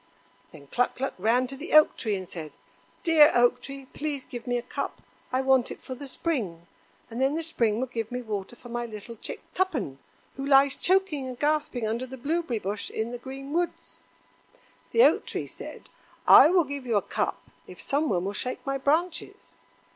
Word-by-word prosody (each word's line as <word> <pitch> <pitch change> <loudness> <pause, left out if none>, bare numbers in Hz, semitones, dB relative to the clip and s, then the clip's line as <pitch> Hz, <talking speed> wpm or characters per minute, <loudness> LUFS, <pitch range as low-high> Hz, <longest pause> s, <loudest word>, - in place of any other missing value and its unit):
Then 145 -2 -13
Cluck 245 - 0
cluck 270 +2 -2
ran 235 +6 +3
to 270 +2 -6
the 295 +6 -7
Oak 305 0 +7
tree 215 -4 -1
and 185 -1 -5
said: 155 -4 -7 0.5
"Dear 320 -4 +7
Oak 245 +1 +4
tree, 275 +1 -8
please 290 -3 -3
give 240 0 -8
me 245 0 +1
a 240 - -4
cup. - - -4 0.3
I 255 +1 +1
want 265 -2 +3
it - - -9
for 260 - -6
the 275 +2 -8
Spring; 220 - -2 0.5
and 235 +3 -4
then 270 +3 +2
the 330 - -2
Spring 230 -9 +1
will 260 - 0
give 230 -3 -4
me 250 0 -3
water 210 0 -4
for 240 0 -13
my 240 0 -3
little 220 +1 -9
chick - - -7
Tuppen, 265 - -1 0.4
who 270 - -4
lies 275 0 +6
choking 370 -8 +1
and 255 -1 -6
gasping 295 -5 0
under 235 +4 -2
the 265 +1 -8
blueberry 295 -1 -1
bush 205 0 -4
in 220 +2 -3
the 245 - -5
green 270 +3 -8
woods." 345 +1 -2 0.9
The 460 - +6
Oak - - +4
tree - - -3
said: - - -10 0.4
"I - - +10
will 360 -1 +4
give 280 -3 -6
you 225 -3 +2
a 200 - +1
cup - - -2 0.3
if - - -12
some 295 +2 0
one 180 -1 0
will 200 - -2
shake 255 +4 -4
my 275 0 -1
branches." 325 +5 -1
255 Hz, 200 wpm, -27 LUFS, 230-290 Hz, 0.9 s, I